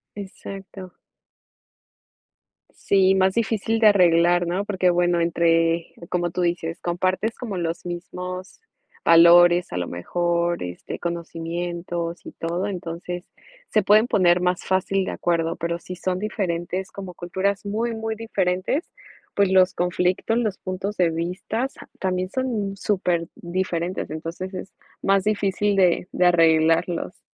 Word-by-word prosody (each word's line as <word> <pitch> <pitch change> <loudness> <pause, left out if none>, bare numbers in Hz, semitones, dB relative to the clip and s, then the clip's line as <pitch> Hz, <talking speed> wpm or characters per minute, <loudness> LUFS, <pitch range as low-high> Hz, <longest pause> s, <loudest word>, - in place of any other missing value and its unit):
Exacto. 195 -2 -9 1.8
Sí, 190 -1 +2
más 190 0 +3
difícil 225 0 0
de 220 - +6
arreglar, 175 -2 +4
¿no? 180 +4 -1
Porque, 190 -3 +1
bueno, 175 0 +2
entre 165 0 +2 0.2
como 175 -1 -1
tú 180 - -2
dices, 170 -1 -1
compartes 185 +6 -1
como 215 -6 -5
los 170 0 -3
mismos 180 - -6 0.4
valores, 175 +1 +6
a - - -2
lo 90 -1 -2
mejor. 170 - -1
Este, 90 0 -6
conocimientos 170 0 -4
y - - -7
todo. 170 +4 -3
Entonces, 175 -1 -5 0.4
se 215 - +2
pueden 215 +4 +5
poner 180 -5 +4
más 180 0 +1
fácil 190 +1 +1
de - - -3
acuerdo. 165 -1 0
Pero, 170 0 -2
si 180 +1 -8
son 180 +1 -2
diferentes, 185 -3 -3
como 190 -2 -8
culturas 190 +4 -2
muy, 225 +3 -1
muy 225 0 -3
diferentes, 200 - -1 0.5
pues 200 -2 +3
los 185 -1 +5
conflictos, 180 +5 0
los 215 -5 -1
puntos 190 +3 -4
de 180 -2 +3
vistas, 180 +10 -3 0.3
también 185 -1 -1
son 220 -5 -2
súper 180 -4 0
diferentes. 175 0 -3
Entonces, 165 +5 -6
es 190 - -7 0.3
más 195 -1 +2
difícil 205 -1 +1
de 180 -2 +3
de 180 - +2
arreglarlos. 165 +1 +3
180 Hz, 130 wpm, -23 LUFS, 170-195 Hz, 1.8 s, de